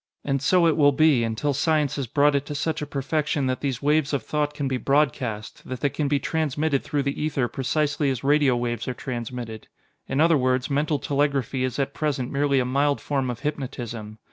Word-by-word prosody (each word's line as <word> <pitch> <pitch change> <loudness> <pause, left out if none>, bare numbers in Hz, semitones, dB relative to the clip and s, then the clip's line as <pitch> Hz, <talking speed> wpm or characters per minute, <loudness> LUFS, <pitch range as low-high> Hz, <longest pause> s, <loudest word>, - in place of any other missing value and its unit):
"And 135 -2 0
so 175 +5 +4
it 165 - +4
will 145 -2 +5
be, 150 -4 +4
until 115 +6 -1
science 150 0 +1
has 140 -3 -3
brought 145 +4 +3
it 140 -1 +1
to 150 - -5
such 160 +2 -1
a 150 - -4
perfection 145 0 -1
that 130 0 -1
these 135 -2 -2
waves 150 0 +2
of 135 -5 0
thought 150 +2 -1
can 145 -2 -2
be 130 -1 -1
broadcast 125 -6 -1
that 130 -1 -5
they 145 - +2
can 150 +2 -1
be 145 0 +2
transmitted 155 -2 0
through 145 -1 -1
the 140 +1 -2
ether 140 -5 0
precisely 145 +4 0
as 130 -3 -3
radio 145 -2 +4
waves 120 -1 -2
are 125 - -2
transmitted. 120 -3 -6 0.4
In 135 - -1
other 165 -1 +5
words, 130 +1 0
mental 150 +2 +1
telegraphy 140 -2 0
is 130 -2 -2
at 140 0 -1
present 140 -5 -2
merely 140 -1 +2
a 125 - +1
mild 140 +3 +1
form 135 -3 -1
of 120 -1 -5
hypnotism. 120 -7 -5
140 Hz, 210 wpm, -24 LUFS, 130-150 Hz, 0.4 s, will